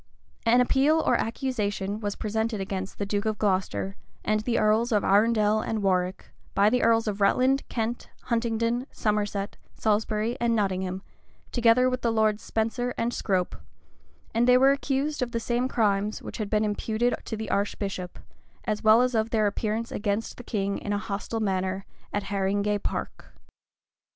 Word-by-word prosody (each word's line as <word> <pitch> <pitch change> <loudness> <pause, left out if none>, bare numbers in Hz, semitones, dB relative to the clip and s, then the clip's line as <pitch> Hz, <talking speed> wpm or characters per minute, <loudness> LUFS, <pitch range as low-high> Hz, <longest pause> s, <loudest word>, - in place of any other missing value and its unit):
[*] - - -36
An 245 +1 +6
appeal 275 +5 +3
or - - +2
accusation 210 -4 -2
was 205 -2 -3
presented 220 0 -2
against 190 0 -4
the 205 - -2
duke 205 +1 -1
of 215 -1 0
Glocester, 195 -1 0 0.3
and 215 0 +2
the 230 +2 -1
earls 220 +3 +2
of 210 -2 +2
Arundel 215 +1 +3
and 215 -2 -2
Warwick, 185 -1 0 0.2
by 205 +2 +4
the 250 0 +2
earls 225 0 +3
of 205 -1 -2
Rutland, 260 +7 +3
Kent, 230 0 -3
Huntingdon, 235 +1 0
Somerset, 205 -2 -1 0.2
Salisbury, 215 +1 0
and 235 -1 +2
Nottingham, 190 -2 -1 0.5
together 240 +1 +4
with 255 0 -1
the 235 - +1
lords 220 -1 +2
Spenser 240 +2 -2
and 235 +1 0
Scrope, 185 -5 -1 0.8
and 235 +2 +2
they 250 0 +7
were 270 +2 +6
accused 280 +1 -1
of 245 -1 -2
the 230 - 0
same 240 +2 0
crimes 210 -4 +1
which - - -8
had 210 -2 -2
been 215 0 +2
imputed 220 +3 0
to 220 - -4
the 220 - -4
archbishop, 195 -3 -2 0.5
as 210 -1 -2
well 220 +3 +6
as 250 0 0
of 220 0 +1
their 220 -2 +2
appearance 215 +3 -1
against 205 +1 -2
the 245 - -9
king 200 -3 -2
in 205 - -3
a - - +1
hostile 205 +2 -4
manner 190 -1 -1 0.3
at 205 - -1
Haringay 200 +1 0
Park. - - -5
215 Hz, 170 wpm, -26 LUFS, 205-235 Hz, 0.8 s, they